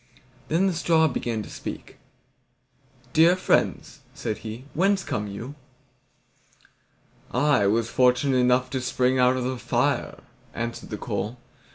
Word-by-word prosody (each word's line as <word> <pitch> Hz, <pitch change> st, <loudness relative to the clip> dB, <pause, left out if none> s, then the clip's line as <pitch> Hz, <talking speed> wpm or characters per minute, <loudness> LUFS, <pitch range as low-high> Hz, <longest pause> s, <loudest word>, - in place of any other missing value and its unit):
Then 170 Hz, +5 st, +2 dB
the 190 Hz, -, +1 dB
straw 165 Hz, -1 st, +3 dB
began 120 Hz, -5 st, -2 dB
to -, -, -11 dB
speak. -, -, -8 dB, 1.2 s
"Dear 165 Hz, +3 st, +6 dB
friends," 185 Hz, -, 0 dB, 0.2 s
said 110 Hz, -, -4 dB
he, 115 Hz, +4 st, -8 dB
"whence 190 Hz, +3 st, +2 dB
come 105 Hz, 0 st, -3 dB
you?" 115 Hz, +7 st, -7 dB, 1.8 s
"I 125 Hz, -6 st, +3 dB
was 115 Hz, +3 st, +1 dB
fortunate 130 Hz, +1 st, +3 dB
enough 125 Hz, 0 st, +2 dB
to 130 Hz, -, -2 dB
spring 125 Hz, +1 st, +1 dB
out 125 Hz, +1 st, +4 dB
of 130 Hz, -, -2 dB
the 130 Hz, 0 st, -3 dB
fire," -, -, -1 dB, 0.3 s
answered 115 Hz, 0 st, -5 dB
the -, -, -4 dB
coal. 110 Hz, +5 st, -4 dB
125 Hz, 135 wpm, -25 LUFS, 115-150 Hz, 1.8 s, Dear